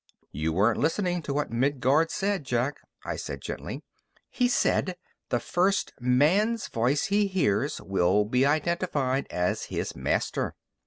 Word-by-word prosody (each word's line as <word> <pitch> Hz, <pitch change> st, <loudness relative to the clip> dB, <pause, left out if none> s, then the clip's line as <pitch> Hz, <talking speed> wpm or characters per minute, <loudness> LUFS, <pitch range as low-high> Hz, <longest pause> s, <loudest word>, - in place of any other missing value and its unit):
"You 75 Hz, +3 st, -1 dB
weren't 100 Hz, +7 st, +2 dB
listening 175 Hz, +2 st, 0 dB
to 145 Hz, -, -4 dB
what 145 Hz, -4 st, -1 dB
Midguard 135 Hz, +5 st, +2 dB
said, 200 Hz, -3 st, -1 dB
Jack," 125 Hz, +2 st, -1 dB, 0.3 s
I -, -, -2 dB
said -, -, -5 dB
gently. -, -, -6 dB, 0.5 s
"He 250 Hz, -, +2 dB
said: 185 Hz, -6 st, +1 dB, 0.3 s
'The 120 Hz, -, +1 dB
first 190 Hz, +9 st, 0 dB
man's 165 Hz, -, +2 dB
voice 125 Hz, +5 st, +1 dB
he 205 Hz, 0 st, +3 dB
hears 145 Hz, -, 0 dB
will 95 Hz, +2 st, +2 dB
be 125 Hz, +4 st, +2 dB
identified 145 Hz, -3 st, 0 dB
as 90 Hz, 0 st, -1 dB
his -, -, -4 dB
master.'" -, -, -1 dB
140 Hz, 140 wpm, -27 LUFS, 120-180 Hz, 0.5 s, he